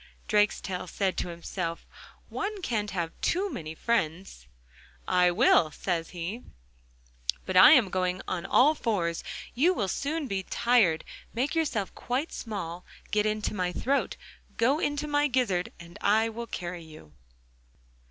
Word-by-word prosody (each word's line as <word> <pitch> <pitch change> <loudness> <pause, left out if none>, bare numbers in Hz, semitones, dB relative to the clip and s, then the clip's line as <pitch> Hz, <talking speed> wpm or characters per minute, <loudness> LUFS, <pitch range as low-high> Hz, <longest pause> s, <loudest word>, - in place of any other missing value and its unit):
Drakestail 195 -3 +1
said 190 0 0
to - - -1
himself: 170 0 -5 0.4
'One 405 -1 -4
can't 210 -6 -1
have 170 -4 -2
too 385 +2 +1
many 160 -1 -6
friends.'... 170 - -2 0.6
'I 180 0 +4
will,' 175 -4 +4
says 165 +1 -2
he, 180 +7 -5 1.0
'but 185 - -3 0.4
going 185 0 0
on 175 -2 -2
all 290 +5 +5
fours 185 - -1 0.3
you 340 +9 +3
will 200 - 0
soon 290 - -2
be 195 -4 -1
tired. 210 -6 +2 0.3
Make 255 +5 0
yourself 265 - -1
quite 260 +6 -2
small, 180 -6 -5 0.3
get 210 0 +2
into 215 0 -1
my 180 -3 -1
throat—go 270 - -1
into 290 0 -1
my 290 0 +2
gizzard 230 -10 0
and 170 0 -12
I 220 +2 +3
will 235 +1 -6
carry 175 -4 -5
you. 155 - -14
200 Hz, 135 wpm, -28 LUFS, 175-250 Hz, 1.0 s, all